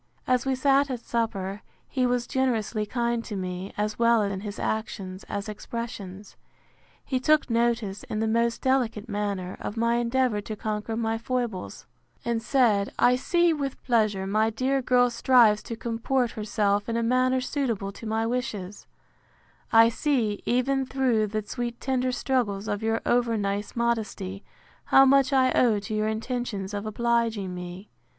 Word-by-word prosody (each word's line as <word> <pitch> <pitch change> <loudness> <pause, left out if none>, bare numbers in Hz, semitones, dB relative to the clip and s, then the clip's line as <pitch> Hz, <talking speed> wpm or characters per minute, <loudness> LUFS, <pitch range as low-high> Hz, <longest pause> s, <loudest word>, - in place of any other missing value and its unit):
As 255 +1 +1
we 265 - +2
sat 275 +1 +3
at 250 -3 -4
supper, 210 -4 -2 0.3
he 255 -2 0
was 245 -1 0
generously 225 -5 -1
kind 235 0 -1
to 215 - -6
me, 185 0 -4
as 210 +1 -2
well 230 -2 +4
in 200 -1 -2
his 205 0 -6
actions, 200 -3 -3
as 200 0 -4
expressions. 210 -3 -7 0.7
He 260 - -1
took 300 0 +2
notice, 230 -4 0
in 215 - -3
the 220 - 0
most 230 +1 +1
delicate 250 -4 +1
manner, 205 -4 -3
of 210 - -5
my 235 +1 +2
endeavour 240 -2 +1
to 215 +1 -6
conquer 215 +1 -3
my 225 -1 -1
foibles; 235 -5 -3 0.4
and 235 -1 0
said, 225 -6 +2
I 250 - +5
see, 345 +6 +2
with 280 -3 -3
pleasure, 215 -6 +1
my 215 +3 +2
dear 260 +4 0
girl 245 -1 +3
strives 235 -3 +4
to 230 - -6
comport 235 +2 -1
herself 205 -1 0
in 230 - 0
a 235 - 0
manner 255 +2 +2
suitable 245 -7 -2
to 220 +3 -9
my 220 +1 0
wishes: 225 -5 -4 0.8
I 230 0 +7
see, 235 -5 0
even 265 +2 +1
through 255 -5 +1
the 215 +1 -3
sweet 240 +1 -4
tender 255 -1 0
struggles 230 -6 -1
of 205 +1 -2
your 225 0 0
over 240 -2 +2
nice 200 0 -2
modesty, 220 -5 -2 0.4
how 270 - +6
much 275 0 +4
I 260 -1 +4
owe 230 -4 +3
to 210 - -6
your 215 0 0
intentions 220 -3 -3
of 205 +1 -3
obliging 230 -3 0
me. 180 +3 -8
230 Hz, 160 wpm, -26 LUFS, 210-250 Hz, 0.8 s, I